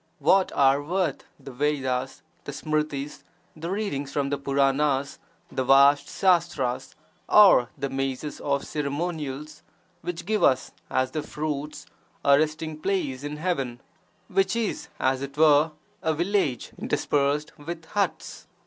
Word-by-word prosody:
What 190 0 +3
are 140 0 +4
worth 170 -1 -1
the 135 0 -10
Vedas, 135 -1 -1 0.2
the - - -5
Smrtis, 150 -1 -3 0.3
the 165 +2 -6
readings 180 -9 -2
from 140 0 -1
the 145 - 0
Puranas, 140 0 +1 0.3
the 130 - -1
vast 140 +2 +5
sastras, 165 -9 +1 0.3
or 195 - +7
the 140 0 -2
mazes 135 +2 -3
of 140 -1 -1
ceremonials, 150 -1 -4 0.4
which 175 -1 -5
give 215 +1 0
us, 130 -1 +3 0.2
as 130 0 0
their 155 - -2
fruits, 150 0 -4 0.4
a 140 - +7
resting 155 0 -2
place 155 -7 -1
in 145 +1 -5
heaven, 135 -8 -2 0.5
(which 195 +1 +1
is, 230 -3 -2
as 130 0 +1
it 140 +1 -6
were,) 155 0 +5 0.3
a 160 -1 0
village 175 -6 0
(interspersed) 145 +1 0
with 165 +2 -7
huts! 200 +4 -3
145 Hz, 130 wpm, -26 LUFS, 135-165 Hz, 0.5 s, or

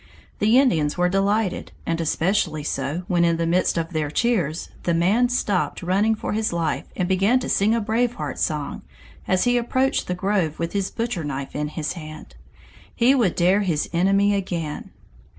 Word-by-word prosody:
The 220 +4 +4
Indians 165 - +2
were 180 0 +2
delighted, 195 +1 0
and 165 0 -1
especially 165 -1 0
so 145 +4 -3
when 175 -1 +2
in 170 -1 +2
the 165 - 0
midst 175 +2 +1
of 165 +1 -2
their 155 -2 -1
cheers, 175 -4 0
the 170 - 0
man 205 +9 +3
stopped 205 -7 -1
running 200 +5 +2
for 215 - -4
his 220 +1 0
life 165 -3 -1
and 180 - -1
began 195 +6 +3
to 255 - -3
sing 210 +3 +2
a - - +1
Brave 235 +3 0
Heart - - -5
song 150 -3 -2 0.5
as 185 0 +2
he 245 0 +3
approached 260 +3 0
the 180 - -1
grove 185 -4 0
with 165 0 -3
his 200 -1 -1
butcher 230 -7 -3
knife 140 -2 -5
in 150 0 -1
his 155 0 -4
hand. 155 - -10 0.6
He 245 +3 +4
would 235 -10 +2
dare 185 +4 +3
his 165 -7 0
enemy 195 +4 +3
again! 175 -6 -3
185 Hz, 185 wpm, -23 LUFS, 165-215 Hz, 0.6 s, The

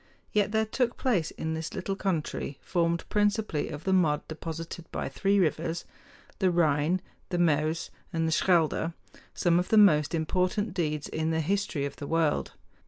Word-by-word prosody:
Yet 205 -1 +2
there 220 0 +2
took 240 +2 -1
place 200 -12 +1
in 160 0 -4
this 160 0 -4
little 195 +1 -2
country, 165 -7 -2
formed 170 -2 0
principally 205 -6 +1
of 145 0 -7
the 190 - +1
mud 160 -5 +2
deposited 165 +1 -6
by - - -3
three 195 +10 +1
rivers, 165 -1 0 0.5
the 190 -2 +3
Rhine, 165 +1 +2 0.3
the 180 - -1
Meuse, 160 -1 +1 0.2
and 165 -2 0
the - - 0
Schelde, 165 -1 +2 0.4
some 175 -1 +3
of 180 - -2
the 220 - +4
most 160 -7 +5
important 185 +5 0
deeds 155 -5 -1
in 160 0 -2
the 160 0 +1
history 165 -3 0
of 140 - -6
the 145 - -6
world. 165 -2 +1
170 Hz, 170 wpm, -28 LUFS, 155-190 Hz, 0.5 s, most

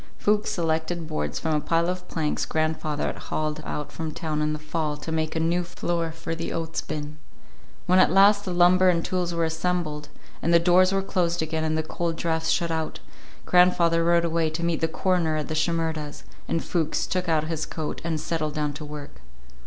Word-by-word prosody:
Fuchs 210 0 +1
selected 165 -3 -1
boards 155 -1 -2
from 160 -1 -1
a 150 - +2
pile 165 +2 +1
of 180 0 -3
planks 155 -2 -1
grandfather 155 -1 -1
had - - -3
hauled 155 0 -2
out 150 -1 -4
from 160 -1 -4
town 155 -1 -3
in 150 0 +1
the 150 - -2
fall 155 -1 -3
to 155 +2 -6
make 160 0 -1
a - - +1
new 170 +2 +1
floor 170 -1 -2
for 165 0 -5
the 165 0 -4
oats 165 -1 -3
bin. 150 0 -6 0.7
When 185 +1 +4
at - - +6
last 200 +2 +5
the 185 - -4
lumber 180 +1 +5
and 170 -2 +1
tools 180 -2 -1
were 170 -1 0
assembled, 160 -3 -2 0.3
and 170 - +1
the 170 - +7
doors 180 +2 +5
were 195 0 +1
closed 175 -3 0
again 160 0 -2
and 155 0 0
the 160 - 0
cold 165 +1 -2
drafts 160 -1 -1
shut 170 -1 +1
out, 160 -1 -2 0.5
grandfather 175 -2 +4
rode 170 0 +3
away 165 -1 +1
to 160 +2 -4
meet 170 -2 0
the 160 - +3
coroner 170 -1 +1
at 150 - -3
the - - -1
Shimerdas', 160 -2 -1 0.2
and 165 - -1
Fuchs 160 -3 0
took 180 -1 -2
off 155 -2 +2
his 160 0 -3
coat 155 -2 -4
and 165 -2 -1
settled 155 -1 -2
down 150 -1 -1
to 150 +2 -7
work. 145 - -9
165 Hz, 205 wpm, -25 LUFS, 155-175 Hz, 0.7 s, the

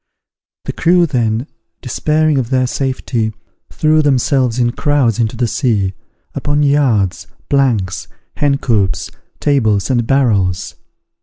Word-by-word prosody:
The - - -3
crew 175 +1 +3
then, 120 -5 -1 0.4
despairing 150 +3 +1
of 120 -3 -3
their 130 -1 +2
safety, 125 -4 -2 0.4
threw 155 0 +2
themselves 130 -3 +1
in 120 -1 +2
crowds 135 -5 +1
into 110 -2 -1
the 125 - +1
sea, 110 -6 0 0.4
upon 145 0 0
yards, 110 - +1 0.2
planks, 115 -10 0 0.3
hen 140 -1 +2
coops, 105 -9 0 0.3
tables, 110 -7 +1
and 120 -3 0
barrels. 105 -10 +1
125 Hz, 120 wpm, -16 LUFS, 110-145 Hz, 0.4 s, crew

